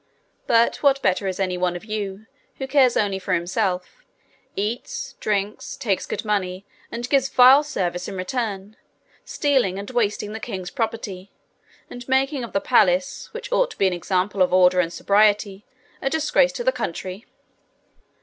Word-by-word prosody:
But 230 0 +3
what 275 -1 +3
better 190 +1 +1
is 190 0 -3
any 185 -2 -1
one 180 -1 0
of 175 - -8
you 210 -1 -5 0.3
who 265 - -5
cares 265 -2 +3
only 200 -2 0
for 185 - -1
himself, 185 - -2 0.5
eats, 215 +5 -4
drinks, 210 +5 -2
takes 210 -9 -1
good 220 - -4
money, 195 -2 -2 0.3
and 240 +1 -4
gives 270 -1 +2
vile 260 +2 +7
service 180 - -3
in - - -6
return, 205 0 -4 0.5
stealing 260 -11 +1
and 200 +4 -6
wasting 210 -3 -1
the 220 - -5
king's 190 -6 -6
property, 210 -5 -4 0.6
and 245 +1 -10
making 265 0 +1
of 235 - -7
the 195 - +1
palace, 185 -6 +2
which 475 +2 -8
ought - - +2
to - - -12
be 195 - +2
an 185 - +2
example 185 +2 -1
of 180 -1 +4
order 180 0 +5
and 170 -2 +1
sobriety, 205 +1 +2 0.3
a 270 - 0
disgrace 320 - +2
to 485 - -4
the - - +3
country?' 185 - -5
210 Hz, 165 wpm, -23 LUFS, 185-250 Hz, 0.6 s, vile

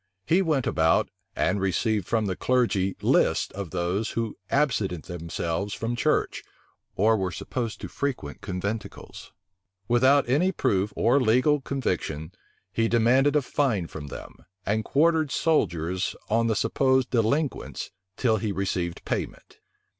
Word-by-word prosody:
He 175 - +3
went 155 -8 +1
about, 80 -1 +2 0.3
and 95 +2 +1
received 100 +1 0
from 110 -2 +1
the 95 -2 -1
clergy 110 -7 +1
lists - - +2
of 100 -3 -6
those 90 +5 -1
who 115 -2 -2
absented 110 - 0
themselves 85 +2 -3
from 115 +1 -2
church, - - 0 0.5
or 110 +3 +4
were 95 -3 -1
supposed 115 +3 -4
to - - -5
frequent 130 - -4
conventicles. 100 +3 -5 0.6
Without 130 +3 +4
any 155 +10 +2
proof 105 - 0
or 120 +5 +3
legal 130 +5 +3
conviction, 90 - -3 0.4
he 115 +3 +2
demanded 125 +5 +3
a 150 - +3
fine 125 -9 0
from 75 -2 -8
them, - - -9 0.3
and 110 +2 0
quartered 160 +3 +2
soldiers 95 - 0 0.2
on 115 +1 +3
the 110 - +1
supposed 130 +4 +2
delinquents, 130 +5 -1 0.3
till 115 -4 +2
he 105 0 -2
received 90 -3 -2
payment. - - -5
110 Hz, 135 wpm, -26 LUFS, 95-130 Hz, 0.6 s, or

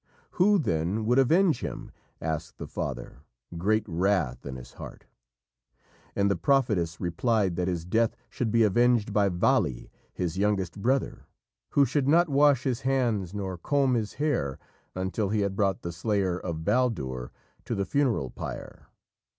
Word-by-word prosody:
"Who, 205 +3 +4
then, 95 - -1
would 125 +4 +3
avenge 160 +2 +4
him?" - - -6 0.3
asked 80 0 -4
the - - -6
father, 65 - -5 0.4
great 105 +5 +1
wrath 85 -8 0
in 65 - -5
his 65 -1 -10
heart. - - -10 1.1
And 100 - +2
the 100 - +2
prophetess 95 -6 +1
replied 95 +2 0
that 90 0 0
his 85 -3 -2
death 115 +5 +1
should 120 - -2
be 115 0 +4
avenged 115 0 +3
by 100 -1 +3
Vali, 70 -8 +1 0.2
his 90 0 -3
youngest 100 -2 0
brother, 130 +5 -1 0.5
who 140 - +5
should 140 -1 0
not 170 +3 +4
wash 140 -2 +4
his 130 -2 -1
hands 115 -8 0
nor 95 -3 -4
comb 135 - +1
his 110 -3 -1
hair 130 - -1 0.4
until 95 +2 -1
he 105 0 +1
had 100 -1 -1
brought 95 -2 0
the 85 - -3
slayer 95 0 -1
of 80 -2 -5
Baldur 65 - 0 0.3
to - - -2
the 100 - -1
funeral 120 - 0
pyre. - - -8
100 Hz, 155 wpm, -27 LUFS, 85-125 Hz, 1.1 s, who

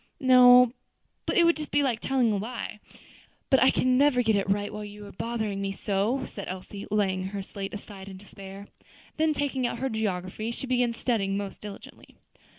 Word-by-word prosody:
"No, 250 -2 +7 0.5
but - - 0
it 345 - +6
would 335 -1 +4
be - - -5
just 300 - -6
like 270 -6 +2
telling 255 -3 +1
a - - 0
lie. 215 0 -5 0.7
But 265 - +5
I 260 - +7
can 255 0 +2
never 275 -3 +4
get 220 -2 +3
it 195 -1 0
right 205 +1 0
while 210 - -5
you 205 0 -9
are 200 - -10
bothering 220 -4 -3
me 195 0 -2
so," 210 +7 -1
said 200 - -8
Elsie, 190 +2 -7
laying 190 -3 0
her 195 0 -4
slate 195 +1 -6
aside 200 -2 -10
in 190 - -9
despair. 195 0 -11 0.5
Then 310 -1 +2
taking 270 -3 -1
out - - -4
her 265 - -2
geography, 215 -1 -3
she 235 - -5
began 245 -2 +1
studying 210 -5 -1
most 200 -1 -6
diligently. 205 -1 -11
215 Hz, 195 wpm, -27 LUFS, 195-250 Hz, 0.7 s, No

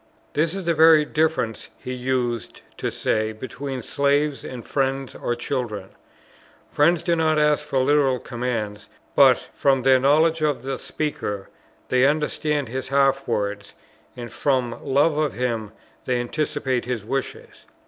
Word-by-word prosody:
This 160 +4 0
is 195 -2 -5
the 170 - +2
very 160 -1 +6
difference, 155 -9 -1
he 130 - -6
used 125 -3 -2
to - - -2
say, 110 0 -1
between 130 +3 -6
slaves, 145 0 +1
and 125 -2 -8
friends 135 -1 -1
or 120 - -2
children. 120 -6 -4 0.8
Friends 165 +3 +3
do 170 -1 +2
not 160 -1 +2
ask 150 -1 +3
for 140 - -3
literal 135 -1 +3
commands; 115 -4 -4 0.3
but, - - +7 0.2
from 135 -2 +2
their 130 0 +5
knowledge 155 +4 +3
of 145 -5 0
the 135 0 -3
speaker, 105 -10 -4 0.4
they 130 +1 +4
understand 150 -1 0
his 130 +3 -5
half 135 0 +2
words, 105 -2 -3 0.4
and 120 -2 -7
from 130 -4 -1
love 145 +3 +2
of 150 -2 0
him 115 -3 -2 0.3
they 125 -1 0
anticipate 135 0 -2
his 120 -4 -3
wishes. 135 +4 -5
135 Hz, 145 wpm, -23 LUFS, 120-150 Hz, 0.8 s, but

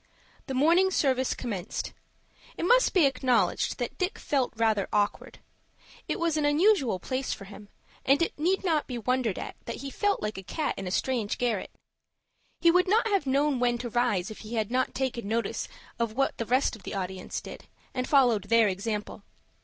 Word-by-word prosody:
The 265 - -3
morning 335 +8 +4
service 265 -7 +1
commenced. 205 -8 -4 0.6
It - - -3
must - - +4
be 360 -7 +4
acknowledged 255 -2 +1
that - - -4
Dick 365 +1 -1
felt 270 -4 0
rather 220 -3 +1
awkward. 205 -1 -1 0.7
It - - -2
was 335 -2 +1
an 305 - +1
unusual 290 - +3
place 255 +8 -3
for 195 - -9
him, 205 +1 -12 0.3
and 275 +2 +4
it 335 - 0
need 360 +7 0
not 320 -5 +1
be 250 - -4
wondered 240 -3 0
at - - -6
that 235 - -4
he 275 - -5
felt 410 +5 +1
like 210 -2 -4
a - - -6
cat 295 - -2
in 195 - -6
a - - -2
strange 225 +1 -1
garret. 235 -5 -1 0.9
He 340 - +6
would 360 +2 +3
not 445 +4 +3
have 390 -9 +1
known 280 0 +2
when 240 -1 +2
to 240 -1 -5
rise 220 -6 +1
if 215 - -9
he 225 +2 -7
had 220 0 -1
not 255 +1 0
taken 250 -5 -2
notice 230 +2 -1 0.3
of 230 -2 -1
what 270 +3 0
the 230 - -2
rest 255 0 +2
of 220 - -14
the 195 - -6
audience 185 -1 -4
did, - - -10 0.3
and 255 0 -3
followed 245 -8 +4
their 225 +1 +4
example. 210 +2 -3
250 Hz, 195 wpm, -28 LUFS, 215-295 Hz, 0.9 s, He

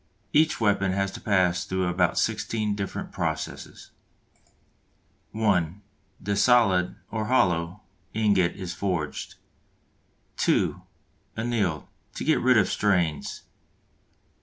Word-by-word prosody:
Each 155 +1 +3
weapon 100 -3 +2
has 100 0 0
to - - -9
pass 90 -3 +2
through 95 0 -1
about 90 0 +1
sixteen 110 -1 0
different 100 -1 -5
processes: - - -5 1.4
(1) 100 -5 +1 0.4
The 100 +1 -2
solid 100 -5 +3 0.2
(or 110 -1 -2
hollow) 90 -6 +1 0.3
ingot 100 -5 +2
is 90 -3 -5
forged. 90 -5 -3 1.0
(2) - - +1 0.6
Annealed, 110 -9 -1 0.3
to - - -4
get 155 - +2
rid 125 -1 +4
of 100 - +4
strains. 90 -7 0
100 Hz, 105 wpm, -26 LUFS, 90-110 Hz, 1.4 s, rid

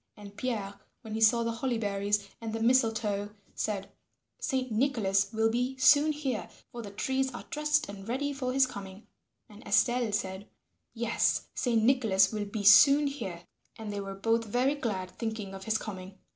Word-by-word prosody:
And 205 -1 -12
Pierre 210 -4 -4 0.2
when 220 -2 -7
he 220 - -3
saw 230 +2 +5
the 230 - -1
holly 235 +1 -2
berries 205 -1 -1
and 225 -1 -5
the 225 - -2
mistletoe 225 -4 +1 0.2
said, 200 -2 -3 0.5
"Saint 260 -2 -2
Nicholas 215 -5 +1
will 225 0 +1
be 250 +3 -1
soon 290 +3 +5
here, 270 -10 -3 0.2
for 240 - -7
the 210 - -8
trees 265 +6 -1
are - - -8
dressed 300 +1 +1
and 200 -1 -9
ready 285 +4 -1
for 260 -2 -3
his 270 +1 +4
coming." 200 -4 -9 0.4
And 210 0 -14
Estelle 240 -2 +2
said, 195 -1 -3 0.5
"Yes, 230 0 +1
Saint 230 -3 +1
Nicholas 220 -6 +3
will 210 -2 -3
be 205 +1 -5
soon 280 +8 +7
here." 190 -12 -5 0.3
And 215 -2 -6
they 200 - -3
were 195 0 -6
both 225 +3 0
very 245 +6 +1
glad 205 -10 -3
thinking 220 -4 -5
of 195 0 -9
his 220 0 +1
coming. 190 -3 -8
225 Hz, 175 wpm, -29 LUFS, 200-255 Hz, 0.5 s, soon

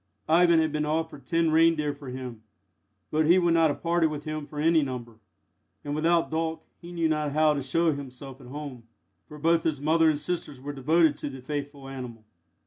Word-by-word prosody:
Ivan 170 +1 +5
had 160 -1 +1
been 150 0 -1
offered 155 -1 -3
ten 165 -1 +2
reindeer 160 -2 +3
for 145 -2 -10
him, 125 -3 -7 0.7
but 155 0 +2
he 175 +3 +6
would 175 -2 +3
not 165 -1 +4
have 145 - -4
parted 170 -1 +2
with 150 -1 -5
him 155 -1 -5
for 150 - -7
any 160 +1 +4
number, 120 -5 -6 0.6
and 145 - -4
without 165 +2 +2
Dolk 160 0 -2 0.2
he 170 0 -10
knew 170 -2 0
not 150 -2 -1
how 155 0 +4
to 140 - -2
show 165 +5 +1
himself 135 -1 -8
at 125 - -13
home, 135 -3 -8 0.4
for 150 - -11
both 165 +2 +2
his 155 -4 -1
mother 160 +2 +3
and 150 -2 0
sisters 150 -3 -4
were 145 +2 -6
devoted 150 +2 +3
to 145 - -5
the 135 -1 -9
faithful 140 0 -6
animal. 125 -4 -8
150 Hz, 205 wpm, -27 LUFS, 140-165 Hz, 0.7 s, he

